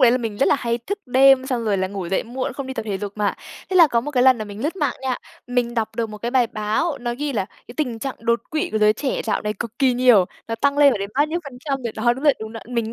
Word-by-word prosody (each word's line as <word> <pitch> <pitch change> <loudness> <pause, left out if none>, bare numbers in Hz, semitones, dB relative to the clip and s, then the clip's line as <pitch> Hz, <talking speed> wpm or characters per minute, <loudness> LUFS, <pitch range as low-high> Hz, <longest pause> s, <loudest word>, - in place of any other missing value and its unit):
lấy 250 -3 +7
là 250 - +2
mình 225 -4 -4
rất - - +3
là - - +4
hay 235 -2 -1
thức 390 - -4
đêm 260 +1 +5
xong 250 -4 -2
rồi 210 -2 +1
là 190 0 0
ngủ 190 -3 -5
dậy 190 - 0
muộn, 255 +3 -4
không 275 +1 -6
đi 265 - -5
tập - - -3
thể 205 -3 -3
dục 205 -1 -5
mà. 210 -1 0 0.4
Thế 375 - +1
là 340 -3 +9
có 235 -4 +2
một 290 +5 -5
cái 255 -4 +2
lần 260 -1 +6
là 215 - -3
mình 205 +1 -8
lướt 320 +6 -2
mạng 290 -8 0
nha, 260 -2 -1 0.3
mình 245 -1 -1
đọc 225 -3 -2
được 230 -2 -1
một 210 - -8
cái 235 +3 -3
bài 250 -2 +3
báo, 220 +9 -1
nó 240 0 -2
ghi 295 0 -2
là 210 -6 0
"cái 240 - -16
tình 250 -7 -2
trạng 270 +3 -4
đột 235 +1 +1
quỵ 310 - -1
của 215 - +1
giới 210 0 +5
trẻ 260 +5 -2
dạo 220 - -1
này 210 - -1
cực 230 0 -7
kỳ 265 -3 +4
nhiều, 245 -6 +5 0.2
nó 230 - -1
tăng 280 +5 +1
lên 285 -2 +7
phải 225 - -2
đến 200 +1 -4
bao 290 +3 +3
nhiêu 335 +3 -2
phần 265 -3 -9
trăm 275 -3 -2
rồi" 235 -2 -3
đó, 240 +2 +3
đúng 265 +4 -8
rồi, 290 -3 +6
đúng 220 0 -6
đó! 225 - -7
Mình 230 -2 -2
240 Hz, 325 wpm, -22 LUFS, 220-270 Hz, 0.4 s, là